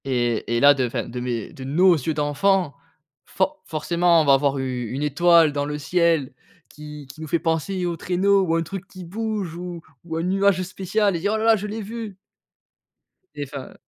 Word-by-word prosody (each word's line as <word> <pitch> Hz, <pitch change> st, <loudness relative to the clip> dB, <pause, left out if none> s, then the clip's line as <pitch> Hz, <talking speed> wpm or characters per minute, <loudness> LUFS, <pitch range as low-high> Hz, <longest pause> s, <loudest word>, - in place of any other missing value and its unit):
Et 120 Hz, -3 st, -1 dB
et -, -, +2 dB
là 145 Hz, +2 st, +7 dB
de 130 Hz, -3 st, 0 dB
enfin, 120 Hz, -, -3 dB
de 125 Hz, -, -6 dB
mes 120 Hz, -3 st, -4 dB
de 130 Hz, -, -9 dB
nos 175 Hz, +8 st, +4 dB
yeux 155 Hz, +1 st, -2 dB
d'enfants, 150 Hz, +3 st, +1 dB, 0.5 s
for 300 Hz, +1 st, -2 dB
forcément, 170 Hz, +2 st, +2 dB
on -, -, 0 dB
va 140 Hz, -1 st, +6 dB
voir 140 Hz, 0 st, 0 dB
u 125 Hz, -3 st, -3 dB
une 135 Hz, +3 st, -3 dB
étoile 165 Hz, +2 st, +4 dB
dans 145 Hz, 0 st, -1 dB
le 150 Hz, 0 st, -4 dB
ciel 165 Hz, -3 st, +1 dB, 0.4 s
qui 150 Hz, -1 st, -10 dB
qui 155 Hz, -, -14 dB
nous 160 Hz, -, -6 dB
fait 170 Hz, -, +1 dB
penser 170 Hz, +3 st, -1 dB
au 170 Hz, -1 st, -2 dB
traîneau 195 Hz, +3 st, +2 dB
ou 165 Hz, -3 st, 0 dB
un 165 Hz, -, +1 dB
truc 195 Hz, +3 st, -7 dB
qui 185 Hz, -2 st, -11 dB
bouge 205 Hz, -2 st, -4 dB
ou 175 Hz, -1 st, -7 dB, 0.2 s
ou 160 Hz, -1 st, -4 dB
un 165 Hz, -, -2 dB
nuage 190 Hz, 0 st, +2 dB
spécial 195 Hz, +2 st, -1 dB
et -, -, -2 dB
dire: 200 Hz, +5 st, 0 dB
«Oh -, -, 0 dB
là 220 Hz, -, -2 dB
là, 225 Hz, -1 st, +6 dB
je 210 Hz, 0 st, -4 dB
l'ai 220 Hz, +2 st, -5 dB
vu!». 215 Hz, -1 st, -7 dB, 1.2 s
Et 145 Hz, -, -4 dB
enfin, 140 Hz, -1 st, -9 dB
165 Hz, 210 wpm, -23 LUFS, 145-190 Hz, 1.2 s, là